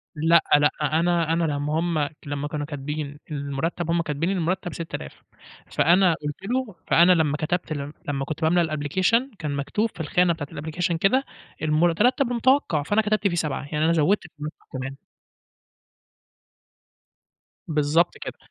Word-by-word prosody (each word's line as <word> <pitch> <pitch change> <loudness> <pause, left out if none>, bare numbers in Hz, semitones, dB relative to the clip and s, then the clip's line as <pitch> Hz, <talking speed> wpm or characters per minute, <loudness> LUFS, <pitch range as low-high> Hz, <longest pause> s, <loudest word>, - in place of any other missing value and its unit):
لأ، 165 +2 +4 0.2
لأ 145 0 +4
أنا 165 +2 +2
أنا 170 +1 +1
لمّا 150 0 0
هُم 165 -4 0 0.2
لمّا 145 0 -3
كانوا 150 -1 -3
كاتبين 145 0 -5
إن 150 - -2
المرتّب 145 +5 -3
هُم 170 0 +2
كاتبين 155 +2 -2
إن 195 - 0
المرتب 175 0 -1
6000. 160 - -7 0.5
فأنا 175 +4 +4
قُلت 150 -1 -3 0.2
له 255 -6 -1
فأنا 175 +2 +6
لمّا 155 -4 +2
كتبت 175 +2 -2
ال 145 -1 -4
لمّا 135 -2 -2
كنت 155 +2 -5
باملا 160 0 +2
الapplication 190 - +1
كان 150 -2 -3
مكتوب 205 +11 -1
في - - -15
الخانة 170 +3 +2
بتاعة 150 -3 -6
الapplication 165 +3 -1
كده، 255 +10 +3 0.4
المرتب 175 - +2
المتوقع، 245 - +2
فأنا 205 +8 +2
كتبت 215 -1 +1
فيه 175 - -1
7 150 -6 -2
يعني 155 0 +1
أنا 165 - +3
زوّدت 170 +6 +2 0.2
فلوس 150 +1 -4 0.2
كمان. 135 +1 -5 2.7
بالضبط 155 +2 +2
كده. - - -7
160 Hz, 150 wpm, -24 LUFS, 150-175 Hz, 2.7 s, فأنا